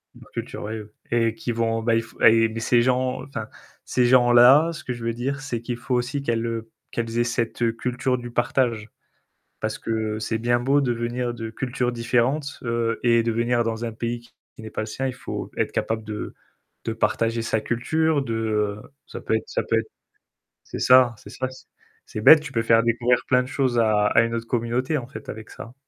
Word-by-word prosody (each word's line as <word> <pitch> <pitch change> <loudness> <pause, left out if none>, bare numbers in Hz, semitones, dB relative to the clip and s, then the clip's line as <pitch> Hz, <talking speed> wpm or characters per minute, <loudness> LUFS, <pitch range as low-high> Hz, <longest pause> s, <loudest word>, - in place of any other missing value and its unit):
La - - -15
culture, - - -5
oui, 110 +2 -4
oui. 105 - -11 0.2
Et 115 -1 +2
qui 120 +2 -4
vont 115 0 0
bah, 115 0 +2
il 115 - +1
f 115 - -16
et 115 0 +6
beh, 115 +1 -5
ces 120 +1 +3
gens 130 +1 0
enfin 110 -6 -6 0.4
ces 125 -1 +2
gens-là, 125 +5 +6
ce - - -9
que 125 - -3
je 120 -1 -8
veux 115 - 0
dire, 135 +4 -3
c'est 125 -5 -4
qu'il 120 0 -4
faut 125 +1 -2
aussi 125 +3 -1
qu'elles, 115 -3 -1
heu, 115 -1 -4 0.2
qu'elles 115 0 -3
aient 120 - +4
cette, 120 -1 -2
heu, 115 -1 +3
culture 125 +2 -1
du 120 0 -7
partage. 120 -2 0 0.7
Parce - - -3
que 110 -1 -2
c'est 110 +1 -2
bien 120 +1 +1
beau 140 +3 +3
de 125 -3 +1
venir 120 +1 -2
de 115 -1 -6
cultures 125 +1 -2
différentes, 120 +5 0
heu, 115 -1 -1
et 115 -1 +4
de 115 0 0
venir 120 +1 +1
dans 115 0 -2
un 115 - -4
pays 115 +1 -3
qui 120 -1 -19
n'est 110 - -8
pas - - -3
le - - -4
sien, 130 +5 -3
il 130 - -3
faut 125 - -6
être - - -1
capable 110 -1 -2
de 105 0 -6 0.5
de 115 - -2
partager 115 +1 0
sa 110 -1 0
culture, 155 +7 +1
de, 115 -4 -3
heu 105 -2 -1 0.2
ça - - -8
peut - - 0
être 110 - -5
ça - - -1
peut 115 - +1
être 115 - -4 0.8
c'est - - -7
ça, 125 -2 +6
c'est - - -13
ça 130 0 -3
c 130 - -14 0.4
c'est 110 - -5
bête, 155 +8 +9
tu 150 -1 -8
peux 115 - 0
faire 115 0 +4
découvrir 120 +1 +2
plein 125 -1 +4
de 125 - -6
choses 130 -3 0
à 110 -2 +3
à - - +4
une 115 0 -1
autre 115 0 -3
communauté, 120 +6 0
en 120 - -8
fait, 140 - -10
avec 110 +1 -8
ça. 115 +2 -10
120 Hz, 225 wpm, -24 LUFS, 115-125 Hz, 0.8 s, bête